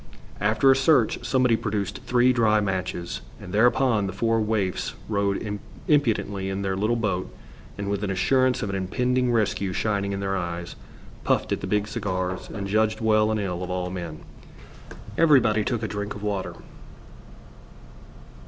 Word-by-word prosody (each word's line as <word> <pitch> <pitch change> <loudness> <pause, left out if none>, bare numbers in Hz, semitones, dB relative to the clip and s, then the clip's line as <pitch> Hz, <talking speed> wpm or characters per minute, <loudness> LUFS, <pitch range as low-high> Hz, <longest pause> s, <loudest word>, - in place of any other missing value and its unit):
After 110 +6 +4
a - - +5
search, 135 -3 +3
somebody 125 -3 +3
produced 100 -3 -3
three 125 +1 +4
dry 110 -3 +3
matches, 95 -3 -3 0.2
and 90 - -9
thereupon 115 -1 +3
the 95 - -5
four 115 +2 +1
waifs 105 -4 -1
rode 100 0 -1 0.3
impudently 105 -9 +1
in 95 +1 -3
their 95 -1 -1
little 105 +5 +1
boat, 100 -6 -2 0.5
and 100 0 -4
with 100 0 -2
an 100 - -1
assurance 130 +6 +2
of 100 - -2
an - - -3
impending 125 +6 0
rescue 100 -4 0
shining 100 0 -1
in 100 - -3
their 95 0 -1
eyes, 85 -1 -4 0.5
puffed - - +1
at - - -1
the - - -4
big 105 0 0
cigars 95 -4 -3
and 100 -2 -5
judged 110 +2 +1
well 110 -1 +3
and 110 0 0
ill 90 -3 -3
of 90 - -4
all 90 0 -2
men. 85 -4 -6 1.0
Everybody 130 -9 +5
took 115 +1 -2
a - - 0
drink 105 0 -4
of 105 - -9
water. 100 -3 -2
105 Hz, 160 wpm, -25 LUFS, 95-115 Hz, 1.0 s, a